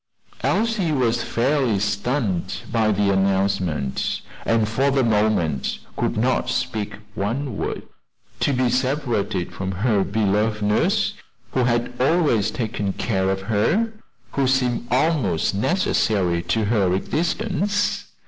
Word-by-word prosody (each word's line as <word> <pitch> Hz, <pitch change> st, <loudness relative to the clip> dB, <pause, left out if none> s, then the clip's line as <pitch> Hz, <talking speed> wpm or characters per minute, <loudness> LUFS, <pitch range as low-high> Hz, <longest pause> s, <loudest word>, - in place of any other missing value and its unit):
Elsie 220 Hz, -7 st, +1 dB
was 120 Hz, -4 st, +1 dB
fairly 125 Hz, -2 st, +1 dB
stunned 105 Hz, -1 st, -1 dB
by 110 Hz, -2 st, +2 dB
the 100 Hz, -1 st, +2 dB
announcement, 95 Hz, -7 st, 0 dB, 0.3 s
and 115 Hz, -2 st, +3 dB
for 115 Hz, +6 st, 0 dB
a 135 Hz, -1 st, +3 dB
moment 105 Hz, -, +1 dB, 0.2 s
could -, -, -1 dB
not 125 Hz, +4 st, +1 dB
speak 110 Hz, -5 st, -2 dB, 0.2 s
one 115 Hz, +5 st, -2 dB
word. -, -, -3 dB, 0.6 s
To -, -, +2 dB
be 130 Hz, -1 st, +1 dB
separated 125 Hz, -, -1 dB
from 95 Hz, 0 st, -3 dB
her 100 Hz, +1 st, +1 dB
beloved 105 Hz, +1 st, 0 dB
nurse 105 Hz, +1 st, +2 dB, 0.4 s
who 130 Hz, -2 st, +1 dB
had 120 Hz, 0 st, 0 dB
always 140 Hz, -, +3 dB
taken 105 Hz, -4 st, -2 dB
care 95 Hz, -4 st, 0 dB
of 95 Hz, 0 st, -1 dB
her! 115 Hz, -, +1 dB, 0.4 s
who 135 Hz, -2 st, +1 dB
seemed 125 Hz, -2 st, +1 dB
almost 130 Hz, -, +1 dB
necessary 100 Hz, -, +1 dB
to 110 Hz, +4 st, 0 dB
her 100 Hz, -4 st, +2 dB
existence. 205 Hz, -, -1 dB
110 Hz, 120 wpm, -22 LUFS, 100-130 Hz, 0.6 s, and